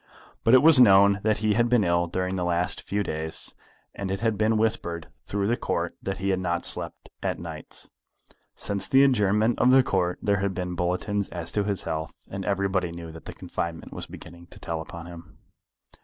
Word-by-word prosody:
But 115 Hz, -, +6 dB
it 130 Hz, -, +6 dB
was 160 Hz, -4 st, +9 dB
known 100 Hz, -3 st, +6 dB
that 110 Hz, 0 st, +1 dB
he 105 Hz, -, +3 dB
had 120 Hz, +2 st, +2 dB
been 120 Hz, -3 st, +3 dB
ill 85 Hz, -1 st, +1 dB
during 95 Hz, +2 st, -2 dB
the 90 Hz, -, -2 dB
last 90 Hz, +1 st, 0 dB
few 100 Hz, +1 st, -2 dB
days, 80 Hz, -2 st, -2 dB, 0.4 s
and 100 Hz, -1 st, -5 dB
it 95 Hz, 0 st, -2 dB
had 115 Hz, -1 st, 0 dB
been 110 Hz, +2 st, +1 dB
whispered 110 Hz, -7 st, -1 dB, 0.2 s
through 100 Hz, -1 st, -1 dB
the 115 Hz, +4 st, +1 dB
Court -, -, -3 dB
that 95 Hz, 0 st, -4 dB
he 95 Hz, +1 st, -2 dB
had 95 Hz, -1 st, +1 dB
not 85 Hz, -2 st, -1 dB
slept -, -, 0 dB
at -, -, -2 dB
nights. -, -, -8 dB, 0.7 s
Since 100 Hz, -1 st, 0 dB
the 135 Hz, +1 st, +5 dB
adjournment 110 Hz, -3 st, +2 dB
of 125 Hz, -, +4 dB
the 130 Hz, 0 st, +6 dB
Court 90 Hz, -5 st, 0 dB
there 100 Hz, -1 st, +1 dB
had 100 Hz, -1 st, -2 dB
been 90 Hz, -1 st, -3 dB
bulletins 90 Hz, +4 st, -1 dB
as 85 Hz, -2 st, -5 dB
to 105 Hz, -1 st, 0 dB
his 100 Hz, -3 st, -2 dB
health, 80 Hz, 0 st, -4 dB
and 95 Hz, 0 st, -6 dB
everybody 95 Hz, -3 st, 0 dB
knew 85 Hz, -1 st, -8 dB
that 80 Hz, -1 st, -12 dB
the -, -, -7 dB
confinement 85 Hz, -1 st, -5 dB
was -, -, -6 dB
beginning 85 Hz, +1 st, -12 dB
to -, -, -13 dB
tell 80 Hz, -1 st, -4 dB
upon 85 Hz, +1 st, -9 dB
him. 85 Hz, -1 st, -12 dB
95 Hz, 205 wpm, -25 LUFS, 85-105 Hz, 0.7 s, was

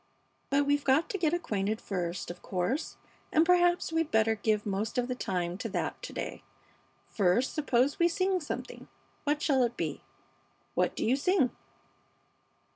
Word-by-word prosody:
But 280 Hz, +1 st, +3 dB
we've 285 Hz, 0 st, +2 dB
got 275 Hz, +5 st, +3 dB
to 395 Hz, -, -2 dB
get 320 Hz, -3 st, +2 dB
acquainted 215 Hz, -, -1 dB
first, 175 Hz, -2 st, -3 dB
of 175 Hz, -, -11 dB
course, 190 Hz, -, -2 dB, 0.3 s
and 320 Hz, +1 st, +4 dB
perhaps 350 Hz, -1 st, +3 dB
we'd 325 Hz, -1 st, +1 dB
better 220 Hz, 0 st, +3 dB
give 215 Hz, 0 st, 0 dB
most 205 Hz, +3 st, -2 dB
of 245 Hz, 0 st, +1 dB
the 255 Hz, -, -1 dB
time 180 Hz, -6 st, -2 dB
to -, -, -3 dB
that -, -, -3 dB
to -, -, -6 dB
day. -, -, -5 dB, 0.7 s
First, 210 Hz, +5 st, +2 dB
suppose 275 Hz, -2 st, +1 dB
we 340 Hz, -, +5 dB
sing 370 Hz, +2 st, +1 dB
something. 300 Hz, -, -6 dB, 0.4 s
What 295 Hz, +1 st, 0 dB
shall 270 Hz, -4 st, +3 dB
it 240 Hz, -1 st, 0 dB
be? -, -, -3 dB, 0.7 s
What -, -, +1 dB
do -, -, -1 dB
you 245 Hz, -, +3 dB
sing?" 285 Hz, -2 st, +2 dB
260 Hz, 165 wpm, -30 LUFS, 210-315 Hz, 0.7 s, we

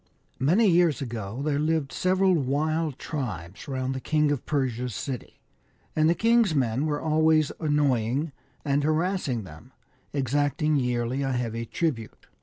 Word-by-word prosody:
MANY 175 Hz, -, +3 dB
years 170 Hz, -4 st, +4 dB
ago 115 Hz, -2 st, -5 dB
there 145 Hz, -1 st, 0 dB
lived 155 Hz, -2 st, 0 dB
several 185 Hz, +1 st, +2 dB
wild 155 Hz, 0 st, 0 dB
tribes 100 Hz, -, -5 dB
round 130 Hz, -1 st, -2 dB
the 130 Hz, -, -3 dB
King 150 Hz, 0 st, +2 dB
of 140 Hz, -4 st, -2 dB
Persia's 125 Hz, -5 st, -1 dB
city, 130 Hz, +1 st, -6 dB, 0.6 s
and 155 Hz, 0 st, +4 dB
the 170 Hz, -, +3 dB
king's 230 Hz, -5 st, +3 dB
men 130 Hz, +2 st, +1 dB
were 145 Hz, -1 st, -1 dB
always 155 Hz, -1 st, +3 dB
annoying 145 Hz, -2 st, +1 dB, 0.3 s
and 140 Hz, 0 st, +1 dB
harassing 155 Hz, -, 0 dB
them, 95 Hz, +9 st, -13 dB, 0.4 s
exacting 145 Hz, +3 st, +1 dB
yearly 125 Hz, 0 st, 0 dB
a 135 Hz, -1 st, 0 dB
heavy 115 Hz, -2 st, -2 dB
tribute. 125 Hz, -9 st, -3 dB
145 Hz, 140 wpm, -26 LUFS, 125-155 Hz, 0.6 s, years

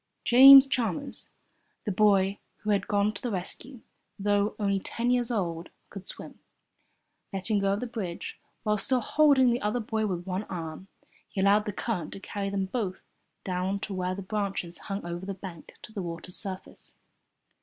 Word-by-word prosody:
James 270 Hz, +2 st, +10 dB
Chalmers 235 Hz, -9 st, -2 dB, 0.6 s
the 210 Hz, -, 0 dB
boy 200 Hz, -1 st, +3 dB, 0.2 s
who 210 Hz, -, 0 dB
had 200 Hz, -1 st, +1 dB
gone 205 Hz, 0 st, +2 dB
to 200 Hz, -, -7 dB
the 245 Hz, -, -2 dB
rescue 225 Hz, +6 st, -5 dB, 0.4 s
though 205 Hz, 0 st, +1 dB
only 200 Hz, -2 st, +1 dB
ten 235 Hz, +5 st, -1 dB
years 245 Hz, -1 st, +1 dB
old, 175 Hz, -7 st, -2 dB, 0.2 s
could 195 Hz, -2 st, -9 dB
swim. -, -, -9 dB, 0.9 s
Letting 200 Hz, +2 st, 0 dB
go 195 Hz, 0 st, +2 dB
of 200 Hz, -, -2 dB
the -, -, -2 dB
bridge, 205 Hz, -8 st, -5 dB, 0.2 s
while 210 Hz, -2 st, +1 dB
still 255 Hz, +5 st, +2 dB
holding 285 Hz, +1 st, +4 dB
the 240 Hz, +1 st, 0 dB
other 210 Hz, +4 st, 0 dB
boy 220 Hz, -1 st, -1 dB
with 175 Hz, -3 st, -3 dB
one 190 Hz, +2 st, -3 dB
arm, 165 Hz, +1 st, -6 dB, 0.4 s
he -, -, -5 dB
allowed 200 Hz, +2 st, +4 dB
the 210 Hz, -, -2 dB
current 200 Hz, -5 st, -3 dB
to -, -, -8 dB
carry 195 Hz, 0 st, -4 dB
them 195 Hz, -1 st, -1 dB
both 190 Hz, -2 st, -3 dB, 0.4 s
down 185 Hz, +1 st, -1 dB
to 205 Hz, -, -4 dB
where 185 Hz, 0 st, -2 dB
the 195 Hz, -, -6 dB
branches 195 Hz, -4 st, -3 dB
hung 195 Hz, -2 st, -3 dB
over 175 Hz, +1 st, -5 dB
the 195 Hz, -, -3 dB
bank 180 Hz, -4 st, -10 dB
to 215 Hz, -, -10 dB
the 200 Hz, -, -3 dB
water's 170 Hz, +1 st, -6 dB
surface. 190 Hz, -2 st, -7 dB
200 Hz, 175 wpm, -28 LUFS, 185-220 Hz, 0.9 s, James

